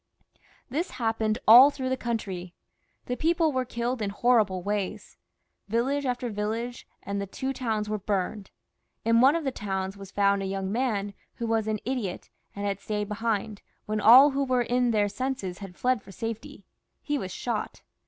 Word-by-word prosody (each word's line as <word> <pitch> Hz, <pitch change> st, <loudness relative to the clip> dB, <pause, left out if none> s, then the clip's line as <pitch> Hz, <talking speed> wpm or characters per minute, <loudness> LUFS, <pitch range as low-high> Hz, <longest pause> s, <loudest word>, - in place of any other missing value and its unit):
This 315 Hz, +9 st, -2 dB
happened 225 Hz, -2 st, 0 dB
all 245 Hz, +6 st, +10 dB
through 265 Hz, -3 st, -4 dB
the 260 Hz, -, +1 dB
country; 195 Hz, -8 st, -4 dB, 0.5 s
the 250 Hz, -, -2 dB
people 325 Hz, +2 st, +2 dB
were 260 Hz, -2 st, -1 dB
killed 240 Hz, 0 st, -3 dB
in 205 Hz, -, -1 dB
horrible 205 Hz, -4 st, +2 dB
ways; 205 Hz, -1 st, -3 dB, 0.5 s
village 260 Hz, +6 st, 0 dB
after 245 Hz, 0 st, -1 dB
village, 225 Hz, +4 st, -3 dB, 0.2 s
and 200 Hz, 0 st, -3 dB
the 200 Hz, -, -4 dB
two 265 Hz, +7 st, -3 dB
towns 220 Hz, -5 st, -2 dB
were 215 Hz, 0 st, -2 dB
burned. 200 Hz, +1 st, -2 dB, 0.6 s
In 230 Hz, +1 st, +4 dB
one 270 Hz, +4 st, +6 dB
of 335 Hz, -, -1 dB
the 270 Hz, -, -1 dB
towns 195 Hz, -4 st, -3 dB
was 195 Hz, -1 st, -10 dB
found 200 Hz, 0 st, +2 dB
a 195 Hz, -, -2 dB
young 195 Hz, 0 st, -3 dB
man 210 Hz, -4 st, -1 dB, 0.2 s
who 235 Hz, -, -4 dB
was 225 Hz, -1 st, 0 dB
an 215 Hz, 0 st, 0 dB
idiot, 240 Hz, -8 st, -3 dB, 0.2 s
and 200 Hz, 0 st, -4 dB
had 200 Hz, -1 st, -1 dB
stayed 210 Hz, 0 st, -3 dB
behind, 215 Hz, -1 st, -2 dB, 0.2 s
when 215 Hz, 0 st, -2 dB
every 270 Hz, +6 st, +8 dB
one 255 Hz, -3 st, +1 dB
in 245 Hz, +1 st, +1 dB
their 210 Hz, -3 st, +2 dB
senses 205 Hz, -5 st, -4 dB
had 195 Hz, -3 st, -9 dB
fled 250 Hz, -3 st, +1 dB
for 195 Hz, -, -14 dB
safety. 225 Hz, +1 st, -6 dB, 0.4 s
He 290 Hz, -1 st, -1 dB
was 185 Hz, -5 st, -5 dB
shot. 230 Hz, +2 st, -4 dB
225 Hz, 175 wpm, -27 LUFS, 200-250 Hz, 0.6 s, all